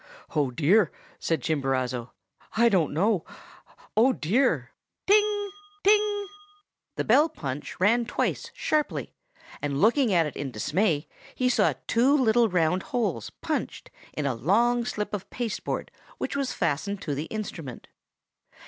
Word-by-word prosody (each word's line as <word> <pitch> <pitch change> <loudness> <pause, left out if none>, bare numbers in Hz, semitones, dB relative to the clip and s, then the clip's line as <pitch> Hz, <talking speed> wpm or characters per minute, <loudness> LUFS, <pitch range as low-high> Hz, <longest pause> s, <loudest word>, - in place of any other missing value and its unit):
"'Oh, 145 -4 +2
dear!' 165 - +3 0.3
said 160 -6 -1
Chimborazo, 130 -5 -1 0.5
'I 235 +1 +6
don't 180 -8 +2
know. 190 +3 +1 0.7
Oh, 250 +4 +5
dear!' 245 - +1 0.3
"'Ting! 410 0 +3 0.3
ting!' 415 0 +3 0.7
the - - -1
bell 290 +8 +4
punch 145 - -6
rang 230 +5 +3
twice - - -1
sharply; 305 -1 -1 0.5
and 140 -1 -1
looking 235 - +4
at 170 -3 +4
it 150 - -5
in 145 - -4
dismay, 150 - 0 0.3
he 255 0 +1
saw 205 - +3
two 255 - +3
little 235 -3 +4
round 180 0 +2
holes 200 - -1
punched - - -3 0.3
in 150 - -1
a 135 - +1
long 235 - +2
slip 210 -4 -3
of 200 -3 -4
pasteboard 240 -3 -3 0.3
which - - -3
was 275 -2 -1
fastened 175 +4 -1
to 150 - -2
the 145 +3 -3
instrument. 165 - -6
205 Hz, 135 wpm, -26 LUFS, 150-245 Hz, 0.7 s, I